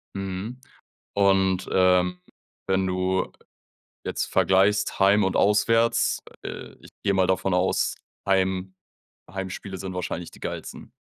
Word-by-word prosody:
Mhm. 95 +5 -5 0.6
Und, 95 -2 +2
ähm, 90 -1 +3 0.5
wenn 95 0 +1
du 95 0 0 0.7
jetzt - - -2
vergleichst 95 +2 +2
heim 100 +1 +5
und 95 - 0
auswärts, 115 +3 +3 0.2
äh, - - -7
ich - - -15
gehe 100 - +2
mal 95 -1 +3
davon 95 0 +1
aus, 90 +1 +1 0.3
Heim 95 -1 +1 0.6
Heimspiele 95 0 -6
sind 95 -1 -6
wahrscheinlich 90 -1 -4
die - - -16
geilsten. - - -7
95 Hz, 120 wpm, -25 LUFS, 95-100 Hz, 0.7 s, heim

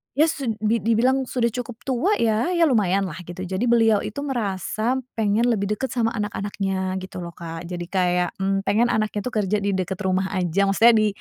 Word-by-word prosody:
ya, 310 +3 +4
su 275 -5 -5 0.2
di 225 +2 +2
dibilang 250 +5 +2
sudah 235 -2 0
cukup 245 0 -6
tua, 270 - +1
ya, 225 - +1
ya, 340 - +4
lumayan, 200 - +3
lah, 175 -2 -5
gitu. 175 +1 -6
Jadi 190 +6 -2
beliau 225 -3 +4
itu 210 - -6
merasa 220 -2 -1 0.2
pengen 215 0 +1
lebih 210 -4 +1
dekat 265 +4 -4
sama 235 -3 +1
anak-anaknya, 195 -3 -2
gitu, 185 - -8
loh, 170 -1 -7
Kak. 165 0 -7
Jadi 175 0 -5
kayak, 180 -2 +1
mmm, 195 0 0
pengen 210 +5 +2
anaknya, 215 -3 0
tuh, 245 +4 -5
kerja 205 +2 0
di 200 -1 -1
dekat 185 0 -3
rumah 190 0 0
aja. 185 0 +1
Maksudnya 230 +4 +6
di 215 -1 +4
210 Hz, 200 wpm, -23 LUFS, 190-235 Hz, 0.2 s, Maksudnya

